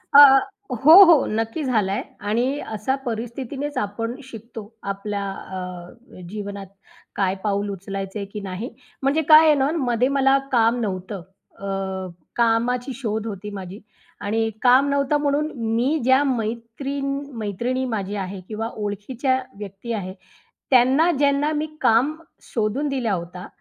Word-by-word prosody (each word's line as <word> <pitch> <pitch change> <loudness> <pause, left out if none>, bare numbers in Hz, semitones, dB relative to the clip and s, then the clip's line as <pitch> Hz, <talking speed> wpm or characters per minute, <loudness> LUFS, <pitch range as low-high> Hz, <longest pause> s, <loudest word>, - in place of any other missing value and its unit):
अ, - - +12 0.5
हो, 275 +7 +6
हो. 335 -5 +6
नक्की 225 +7 -2
झालाय 210 -6 0 0.2
आणि 240 +7 0
अशा 220 +5 -2
परिस्थितीनेच 250 +5 -4
आपण 230 +4 -2
शिकतो. 230 -3 -9 0.2
आपल्या 200 +1 -3
अ, 190 -1 -8 0.6
अ - - -11
जीवनात 200 -2 -6 0.5
काय 195 -1 +1
पाऊल 205 0 0
उचलायचंय 195 +1 -5
की 210 - -4
नाही. 195 +5 -5 0.3
म्हणजे 285 +4 +2
काय 310 +1 +9
आहे 305 - +6
ना, 275 +1 +2
मध्ये 245 -2 +1
मला 270 0 +4
काम 235 0 +3
नव्हतं. 190 -1 -4 0.4
अ, 195 -1 -3 0.3
कामाची 240 +3 +1
शोध 220 -3 -3
होती 210 0 -6
माझी 195 0 -7 0.4
आणि 225 +2 0
काम 255 +3 +5
नव्हतं 280 +1 +2
म्हणून 295 +2 0 0.2
मी 265 +7 +2
ज्या 260 +3 +4
मैत्रीन 245 +3 -3 0.3
मैत्रिणी 235 +5 -2
माझी 210 -4 -3
आहे 190 -1 -4
किंवा 225 +1 -3
ओळखीच्या 230 +6 -1 0.2
व्यक्ती 205 +3 -7
आहे, 185 -3 -4 0.6
त्यांना 265 +6 +5
ज्यांना 285 +1 +2
मी 305 +1 -1
काम 250 +7 +3 0.3
शोधून 235 +6 -1
दिला 250 -6 -1
होता. 180 +1 -5
225 Hz, 135 wpm, -23 LUFS, 200-265 Hz, 0.6 s, अ